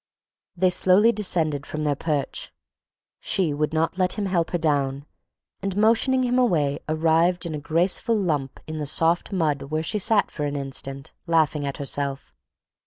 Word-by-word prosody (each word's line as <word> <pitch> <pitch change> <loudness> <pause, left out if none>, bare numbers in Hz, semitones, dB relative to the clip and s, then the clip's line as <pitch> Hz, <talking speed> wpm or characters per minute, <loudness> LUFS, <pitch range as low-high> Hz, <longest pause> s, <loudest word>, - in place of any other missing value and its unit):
They 185 +1 +3
slowly 190 +5 +5
descended 160 -9 0
from 155 0 -4
their 150 -1 +1
perch. 145 -1 -3 0.7
She 175 -6 +1
would 150 +1 -1
not 160 +3 -1
let 180 -1 +2
him 210 - -3
help 175 -4 0
her 175 - -1
down 140 -3 -1 0.6
and 195 -1 -3
motioning 230 +5 +3
him 250 0 +1
away 150 - +1
arrived 165 +3 +2
in 165 - -4
a 150 - -4
graceful 175 - +1
lump 150 -9 -2
in 155 0 -6
the 150 - -3
soft 165 +6 0
mud 155 -7 0
where 155 +3 -3
she 210 +6 -2
sat 210 0 +2
for 150 - -3
an 145 0 -3
instant, 135 0 -5
laughing 155 -3 +1
at 140 - -4
herself. 140 -1 -3
160 Hz, 170 wpm, -24 LUFS, 145-185 Hz, 0.7 s, slowly